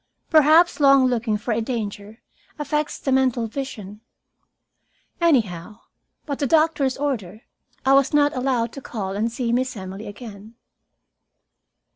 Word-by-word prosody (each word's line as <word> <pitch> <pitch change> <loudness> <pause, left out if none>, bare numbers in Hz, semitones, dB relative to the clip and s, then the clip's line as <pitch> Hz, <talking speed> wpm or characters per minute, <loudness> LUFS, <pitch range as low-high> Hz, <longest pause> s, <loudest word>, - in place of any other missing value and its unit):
Perhaps 315 +3 +5
long 275 -2 +5
looking 235 -3 0
for 230 +3 -4
a 225 +1 0
danger 220 -2 -5 0.3
affects 300 0 -2
the 270 - -3
mental 260 -3 +2
vision. 220 -4 -7 1.2
Anyhow, 215 - 0 0.4
by 290 - -3
the 280 0 -2
doctor's 305 -3 +2
order, 230 -8 -4 0.4
I 270 - +4
was 275 -1 +4
not 290 -1 +2
allowed 250 -3 -1
to 275 - -8
call 195 -6 -5
and 220 +3 -1
see 235 0 -2
Miss 255 -1 -1
Emily 190 +2 -8
again. 210 0 -11
245 Hz, 130 wpm, -22 LUFS, 215-275 Hz, 1.2 s, Perhaps